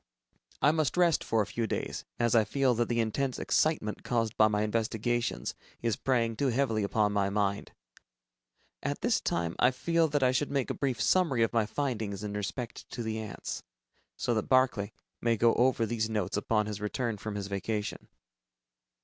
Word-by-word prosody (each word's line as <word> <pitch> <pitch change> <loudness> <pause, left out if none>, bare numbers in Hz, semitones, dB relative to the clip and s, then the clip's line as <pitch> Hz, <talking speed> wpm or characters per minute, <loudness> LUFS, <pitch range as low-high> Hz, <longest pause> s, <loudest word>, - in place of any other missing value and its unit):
I 145 - +7
must 155 -1 0
rest 175 -3 +4
for 110 -2 +2
a - - -6
few 115 +2 -2
days, - - -3
as 120 -1 +2
I 115 -2 +6
feel 130 +4 +2
that 120 0 0
the 120 -1 +1
intense 125 +4 0
excitement 155 -9 0
caused 115 -2 0
by 110 - +6
my 105 0 +1
investigations, 115 - -1 0.3
is 115 -3 +1
preying 115 -4 +1
too 140 +5 0
heavily 120 -3 +1
upon 105 +1 +1
my 100 -1 +2
mind. 100 0 -1 1.1
At - - -3
this - - +2
time, 85 0 -1
I 125 - +6
feel 165 +5 +1
that 145 -2 0
I 125 - +5
should 140 +3 0
make 140 -3 0
a - - -1
brief 130 -5 -1
summary 135 -1 +3
of 115 - 0
my 115 -3 +2
findings 110 -6 -2
in 105 -1 -4
respect 105 +4 -5
to 120 - -5
the 110 0 -2
ants, 110 -2 -5 0.6
so 120 - 0
that 110 -2 -1
Barclay 130 -6 +3 0.3
may 115 -1 +2
go 115 +1 +4
over 120 -1 +3
these 110 0 -1
notes 105 -4 -1
upon 105 +1 +1
his 105 -1 -5
return 115 +1 -2
from 105 0 -5
his 100 -1 -3
vacation. 100 +2 -3
115 Hz, 185 wpm, -30 LUFS, 105-130 Hz, 1.1 s, I